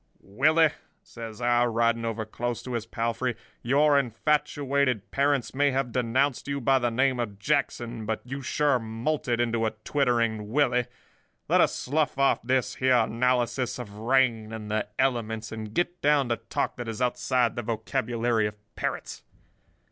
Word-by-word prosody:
"'Willie,' 155 Hz, +9 st, +3 dB, 0.3 s
says 115 Hz, -1 st, -9 dB
I, 120 Hz, 0 st, +3 dB
riding 115 Hz, 0 st, +1 dB
over 110 Hz, -1 st, -2 dB
close 120 Hz, +2 st, -4 dB
to 125 Hz, -, -6 dB
his 115 Hz, -1 st, -3 dB
palfrey, 115 Hz, +1 st, -2 dB, 0.3 s
'your 145 Hz, +3 st, +4 dB
infatuated 140 Hz, -1 st, 0 dB
parents 140 Hz, -2 st, +1 dB
may 145 Hz, +2 st, +3 dB
have 130 Hz, -2 st, -1 dB
denounced 130 Hz, +3 st, 0 dB
you 140 Hz, 0 st, -2 dB
by 135 Hz, +1 st, +3 dB
the 120 Hz, -1 st, +1 dB
name 130 Hz, +2 st, +1 dB
of 105 Hz, -4 st, -3 dB
Jackson, 120 Hz, -3 st, -1 dB
but 110 Hz, 0 st, -1 dB
you 135 Hz, +3 st, -6 dB
sure 140 Hz, 0 st, +1 dB
moulted 120 Hz, +3 st, -2 dB
into 115 Hz, -1 st, +1 dB
a -, -, -3 dB
twittering 115 Hz, -6 st, 0 dB
Willie—let 125 Hz, -3 st, -1 dB
us -, -, +2 dB
slough 145 Hz, 0 st, -1 dB
off 140 Hz, 0 st, +3 dB
this 130 Hz, -1 st, 0 dB
here 130 Hz, -1 st, +4 dB
analysis 125 Hz, +2 st, +1 dB
of 115 Hz, -5 st, -8 dB
rain 115 Hz, -2 st, +2 dB
and 110 Hz, -1 st, -6 dB
the 110 Hz, 0 st, 0 dB
elements, 110 Hz, -4 st, -1 dB
and 110 Hz, -1 st, -6 dB
get 175 Hz, 0 st, -1 dB
down 145 Hz, -3 st, +3 dB
to 115 Hz, -, +1 dB
talk 115 Hz, -, -3 dB
that 120 Hz, -1 st, -5 dB
is 115 Hz, 0 st, -5 dB
outside 125 Hz, -1 st, +1 dB
the 120 Hz, -, -2 dB
vocabulary 115 Hz, 0 st, 0 dB
of 105 Hz, -, -7 dB, 0.2 s
parrots. -, -, -4 dB
120 Hz, 155 wpm, -27 LUFS, 115-135 Hz, 0.3 s, your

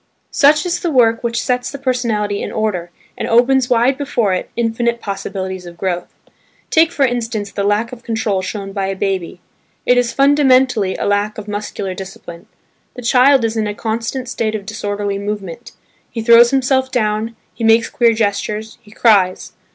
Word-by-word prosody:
Such 300 Hz, +2 st, +4 dB
is 350 Hz, 0 st, -1 dB
the 345 Hz, -, -2 dB
work 230 Hz, -5 st, +3 dB
which 235 Hz, 0 st, -1 dB
sets 250 Hz, 0 st, -1 dB
the 280 Hz, -, -7 dB
personality 230 Hz, -6 st, -1 dB
in -, -, -4 dB
order 205 Hz, -6 st, -2 dB, 0.3 s
and -, -, -4 dB
opens 245 Hz, +2 st, +3 dB
wide 250 Hz, +3 st, +2 dB
before 240 Hz, -8 st, 0 dB
it 185 Hz, -, -3 dB
infinite 235 Hz, 0 st, 0 dB
possibilities 190 Hz, -3 st, -5 dB
of 170 Hz, 0 st, -11 dB
growth. 175 Hz, -1 st, -3 dB, 0.6 s
Take, 325 Hz, +1 st, +4 dB
for 285 Hz, -5 st, +2 dB
instance, 230 Hz, -4 st, -3 dB
the 200 Hz, -, -3 dB
lack 205 Hz, +3 st, 0 dB
of 250 Hz, -2 st, -10 dB
control 220 Hz, -5 st, -1 dB
shown 195 Hz, +1 st, -5 dB
by 195 Hz, -1 st, -2 dB
a 195 Hz, -, -2 dB
baby; 190 Hz, -2 st, -3 dB, 0.4 s
it 245 Hz, 0 st, +4 dB
is 240 Hz, -1 st, 0 dB
fundamentally 260 Hz, -7 st, +3 dB
a -, -, -3 dB
lack 205 Hz, +1 st, 0 dB
of 215 Hz, -1 st, -8 dB
muscular 205 Hz, -2 st, -4 dB
discipline. 185 Hz, -2 st, -10 dB, 0.5 s
The 250 Hz, -, -8 dB
child 255 Hz, +1 st, +4 dB
is 225 Hz, 0 st, -2 dB
in 220 Hz, -1 st, 0 dB
a 205 Hz, -, -4 dB
constant 230 Hz, +4 st, -3 dB
state 225 Hz, -3 st, -2 dB
of 205 Hz, -2 st, -5 dB
disorderly 205 Hz, -1 st, -3 dB
movement: 205 Hz, 0 st, -6 dB, 0.4 s
he 225 Hz, -, -5 dB
throws 235 Hz, +1 st, +7 dB
himself 265 Hz, 0 st, +1 dB
down, 220 Hz, -1 st, -1 dB, 0.2 s
he 235 Hz, -, -7 dB
makes 225 Hz, +1 st, +4 dB
queer 235 Hz, -1 st, +2 dB
gestures, 215 Hz, 0 st, -2 dB
he 215 Hz, -, -19 dB
cries. 200 Hz, -4 st, +2 dB
225 Hz, 175 wpm, -17 LUFS, 200-245 Hz, 0.6 s, throws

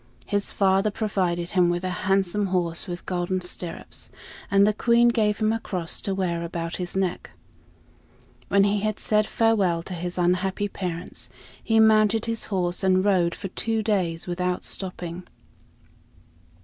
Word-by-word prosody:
His 205 Hz, -1 st, -1 dB
father 195 Hz, +1 st, +2 dB
provided 185 Hz, -5 st, -1 dB
him 180 Hz, -2 st, +3 dB
with 175 Hz, +1 st, -1 dB
a 185 Hz, -, -1 dB, 0.2 s
handsome 195 Hz, +1 st, +2 dB
horse 175 Hz, -1 st, 0 dB
with 175 Hz, -1 st, -6 dB
golden 180 Hz, +1 st, -1 dB
stirrups, 180 Hz, -1 st, -5 dB, 0.4 s
and 200 Hz, 0 st, +5 dB
the 210 Hz, -, +3 dB
Queen 235 Hz, +2 st, +4 dB
gave 215 Hz, -3 st, +1 dB
him 215 Hz, 0 st, +1 dB
a 225 Hz, -, -1 dB
cross 180 Hz, -6 st, -3 dB
to 195 Hz, -, -2 dB
wear 175 Hz, -3 st, -1 dB
about 170 Hz, 0 st, -4 dB
his 180 Hz, +1 st, -4 dB
neck. 185 Hz, -2 st, -1 dB, 1.2 s
When 200 Hz, 0 st, +4 dB
he 205 Hz, +1 st, +2 dB
had 215 Hz, +1 st, -2 dB
said 215 Hz, 0 st, +2 dB
farewell 200 Hz, -7 st, +2 dB
to 185 Hz, -, -6 dB
his 175 Hz, +1 st, -5 dB
unhappy 185 Hz, +3 st, +1 dB
parents, 180 Hz, -2 st, -5 dB, 0.3 s
he 225 Hz, -1 st, +3 dB
mounted 220 Hz, 0 st, +4 dB
his 230 Hz, -1 st, -1 dB
horse 180 Hz, -2 st, -1 dB
and 185 Hz, 0 st, +3 dB
rode 180 Hz, -4 st, +2 dB
for 195 Hz, -, -6 dB
two 225 Hz, +3 st, -1 dB
days 180 Hz, -6 st, 0 dB
without 180 Hz, 0 st, -2 dB
stopping. 180 Hz, -2 st, -5 dB
190 Hz, 155 wpm, -25 LUFS, 175-210 Hz, 1.2 s, and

